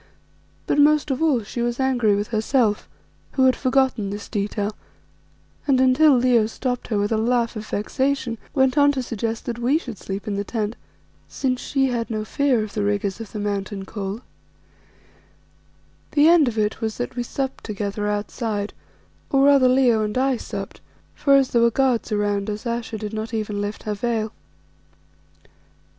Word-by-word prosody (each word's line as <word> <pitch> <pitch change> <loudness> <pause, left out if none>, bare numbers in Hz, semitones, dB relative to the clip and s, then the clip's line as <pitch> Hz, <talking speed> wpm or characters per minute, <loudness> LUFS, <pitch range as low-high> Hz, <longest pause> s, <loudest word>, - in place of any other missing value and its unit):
But - - +1
most 300 0 +4
of 265 - -2
all 285 -8 +2
she 235 +4 -5
was 240 +1 -1
angry 245 -6 +2
with 205 +1 -2
herself, 220 -1 +1 0.4
who 265 - +3
had 260 - +5
forgotten 260 -6 +1
this 205 +1 -6
detail, 205 0 -2 0.9
and 270 -2 +4
until 260 +2 +5
Leo 240 -3 +3
stopped 245 +2 -3
her 215 - -1
with 205 +1 0
a 220 - +2
laugh 235 +1 +1
of 215 0 -6
vexation, 260 +2 -1 0.2
went 265 +1 +3
on 285 0 +6
to 260 -2 -2
suggest 230 -1 -3
that 240 -1 -4
we 255 +6 +2
should 245 - -7
sleep 195 +2 -6
in 200 -1 -2
the 200 - -1
tent, 215 +1 -3 0.5
since 255 -2 -2
she 270 -1 +1
had 235 -2 -2
no 215 -1 -3
fear 260 -3 +1
of 215 - -7
the 210 - -1
rigours 205 0 -1
of 220 - -8
the - - -6
mountain 200 -1 -3
cold. 200 +3 -5 1.9
The 295 +1 +5
end 330 -4 +6
of 230 -2 -2
it 210 0 0
was 220 -1 -2
that 245 0 -4
we 245 - -1
supped 265 +2 -4
together 205 0 -3
outside, 210 0 -2 0.6
or 275 0 +3
rather 275 -2 +6
Leo 250 -3 +4
and 210 +2 -2
I 265 0 +2
supped, 200 -4 -7 0.3
for 280 -1 +3
as 270 -2 +3
there 235 - +3
were 235 - +5
guards 250 -1 +1
around 205 -1 0
us 210 +2 -5
Ayesha 235 -1 -3
did 210 0 -6
not 220 +1 -4
even 210 -2 -2
lift 205 +1 -4
her 210 - -2
veil. 220 0 -2
230 Hz, 180 wpm, -23 LUFS, 210-260 Hz, 1.9 s, on